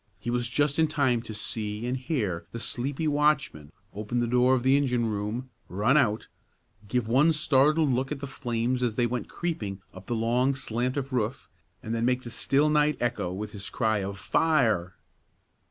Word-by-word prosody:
He 120 - -3
was 120 0 0
just 145 +4 +1
in 160 - +4
time 140 -6 +1
to 115 - -9
see 105 +1 -3
and 125 +1 -1
hear 125 - -2
the 115 - -4
sleepy 135 +7 -3
watchman 145 - +1 0.2
open 105 +4 -3
the 120 - +1
door 125 +2 +3
of 125 - -1
the 130 +1 +4
engine 125 -4 +1
room, 110 +4 -3 0.2
run 105 +9 +2
out, 115 -8 +2 0.6
give 125 0 -1
one 135 +8 +4
startled 150 0 +3
look 130 +2 -1
at 150 - -3
the 140 - -5
flames 125 -1 -2
as 120 -3 0
they 120 - +2
went 120 +1 -3
creeping 110 - -4
up 95 0 -12
the 120 - -1
long 120 +4 +1
slant 125 0 -2
of 135 -1 -3
roof, 120 +1 -2 0.4
and 110 - -4
then 115 0 -1
make 125 +1 +1
the 120 - -7
still 140 +5 +2
night 150 -2 +3
echo 120 -7 -1
with 105 +3 -5
his 100 -1 -7
cry 110 -3 0
of 100 0 -4
"Fire!" 105 - +1
125 Hz, 190 wpm, -27 LUFS, 110-135 Hz, 0.6 s, in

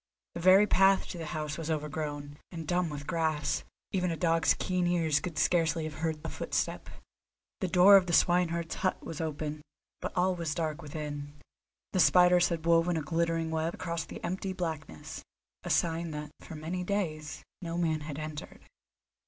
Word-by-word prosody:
The - - -5
very 190 +3 +7
path 195 -1 +4
to 175 - -6
the 160 - -5
house 150 0 -4
was 165 -1 -4
overgrown, 150 -1 -3
and 165 -3 -6
dumb 175 0 +1
with 145 -1 -6
grass; 155 -3 0 0.3
even 180 -2 0
a 165 - -2
dog's 165 -1 +3
keen 180 -1 0
ears 165 -4 +2
could 170 -3 -6
scarcely 165 -2 +2
have 155 0 -6
heard 160 -1 -1
a - - -3
footstep. - - -2 0.7
The 190 - -1
door 185 +3 +8
of 185 -2 +1
the 170 - -1
swineherd's 170 -1 +2
hut 185 - -1
was 165 - -5
open, 155 -1 -3 0.4
but - - -3
all 185 +1 +3
was 170 -3 -3
dark 160 -1 -2
within. 145 -1 -6 0.6
The 185 - +1
spiders 180 +3 +6
had 165 -2 -3
woven 170 0 +3
a 155 - -2
glittering 165 0 0
web 160 +1 -1
across 170 -2 -3
the - - -10
empty 190 +2 -3
blackness, 160 - -5 0.4
a - - -5
sign 165 0 +1
that 150 -1 -6
for 160 - -10
many 165 +4 -4
days 165 -6 -3 0.2
no 170 -1 -4
man 160 -3 +1
had 150 -1 -6
entered. 155 -1 -7
165 Hz, 175 wpm, -30 LUFS, 155-175 Hz, 0.7 s, door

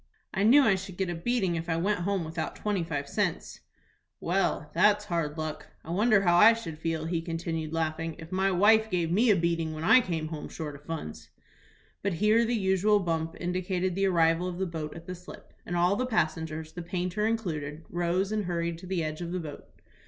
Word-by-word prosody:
"I 190 - -1
knew 250 +8 +7
I 220 - +4
should 190 -1 -5
get 190 -2 -1
a - - -2
beating 190 0 0
if 165 +1 -4
I 165 - +1
went 200 +4 0
home 190 0 -1
without 160 0 -4
twenty 205 -4 -1
five 145 -4 -3
cents." - - -2 0.6
"Well, 175 -4 0
that's 205 +4 +4
hard 165 -5 -2
luck. 155 -1 -5 0.2
I 165 - -7
wonder 210 +3 +4
how 175 -2 +4
I 215 +5 +8
should 165 -9 -7
feel," 160 -1 -2
he 165 0 -1
continued, 165 -2 -4
laughing, 160 0 -2
"if 165 -1 -11
my 190 +1 +2
wife 220 +4 +4
gave 175 -4 0
me 225 +7 +3
a 210 - +6
beating 165 -2 0
when 155 - -5
I 255 +9 +7
came 165 -7 -3
home 155 -2 -6
short 150 -2 -6
of 145 +1 -13
funds." 80 - -6 0.7
But 200 -2 -1
here 210 +6 +3
the 240 +1 0
usual 200 +1 +3
bump 165 -3 -2
indicated 180 +1 -1
the 195 +2 +1
arrival 165 -1 +3
of 180 -1 -5
the 190 - -1
boat 160 -3 -5
at 165 - -10
the 180 - -5
slip, 180 0 -12
and 175 - -2
all 175 +3 +3
the 255 +4 -1
passengers, 160 -6 -1
the 175 - -6
painter 180 +4 -2
included, 160 -9 -3
rose, 175 +3 0
and 215 -2 -1
hurried 170 -1 -2
to 185 - -10
the 180 -3 -1
edge 155 +1 -4
of 170 0 -4
the 185 - -2
boat. 150 -4 -8
175 Hz, 215 wpm, -28 LUFS, 165-195 Hz, 0.7 s, I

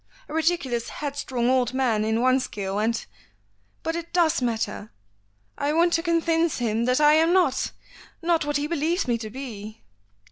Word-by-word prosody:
A - - -9
ridiculous 315 -8 0
headstrong 275 -4 -3
old 255 -1 +2
man 235 -5 +1
in 220 +1 0
one 255 +1 +4
scale, 200 -5 -3
and 225 +1 0 0.4
" 100 0 -42
"But 325 - -2
it 340 0 -5
does 340 -5 +2
matter. 225 -3 -2 0.7
I 290 +1 0
want 340 +2 +3
to 330 - +2
convince 335 -1 +1
him 230 -1 0
that 250 +2 +2
I 300 0 +6
am 325 +2 +4
not 340 -9 +2 0.5
not 335 -1 +1
what 295 -1 0
he 290 - -1
believes 335 +2 0
me 235 -1 +1
to 220 -1 -6
be." 220 -4 -8
265 Hz, 175 wpm, -25 LUFS, 230-325 Hz, 0.7 s, I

